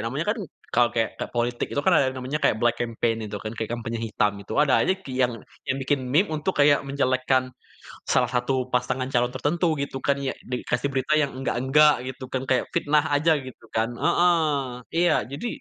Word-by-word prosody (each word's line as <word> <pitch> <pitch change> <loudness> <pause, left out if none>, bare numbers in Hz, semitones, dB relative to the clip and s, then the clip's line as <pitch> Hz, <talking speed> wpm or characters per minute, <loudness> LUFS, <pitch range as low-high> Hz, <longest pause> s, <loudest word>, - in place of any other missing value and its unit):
namanya 125 +8 -2
kan 225 - -8 0.3
kalau 120 0 +4
kayak 115 -1 +1
kayak - - -5
politik 120 0 0
itu 145 - -1
kan 190 - +4
ada 155 - +5
yang 130 - -6
namanya 130 +4 -3
kayak - - +3
black 120 -1 +2
campaign 115 -1 0
itu 105 - -5
kan, 110 - -4
kayak 110 -1 -3
kampanye 115 -1 -4
hitam 105 -1 +1
itu 100 - -9
ada 145 -2 +4
aja - - +3
ki 135 - -7
yang 125 -1 +3 0.4
yang 135 - +1
bikin 135 +1 0
meme 165 +4 +3
untuk 155 +5 -2
kayak 145 -1 +5
menjelekkan 130 -1 +1 0.5
salah - - +2
satu 130 +1 -1
pasangan 125 +1 0
calon 125 -1 +1
tertentu 155 +6 0 0.2
gitu 140 -1 -4
kan, 140 +1 +1
yang 135 -1 -3
de 125 0 -3
dikasih 140 - -1
berita 130 +3 0
yang 145 -3 +1
enggak-enggak 135 +4 +4 0.2
gitu 130 +1 -12
kan, 130 - -2
kayak 130 -2 +2
fitnah 150 +1 +3
aja 145 +3 +3
gitu 130 -1 -12
kan. 110 +1 +1
Heeh. 175 +5 +3 0.6
Iya 175 +1 +3 0.2
jadi 145 +12 -4
130 Hz, 205 wpm, -25 LUFS, 120-145 Hz, 0.6 s, ada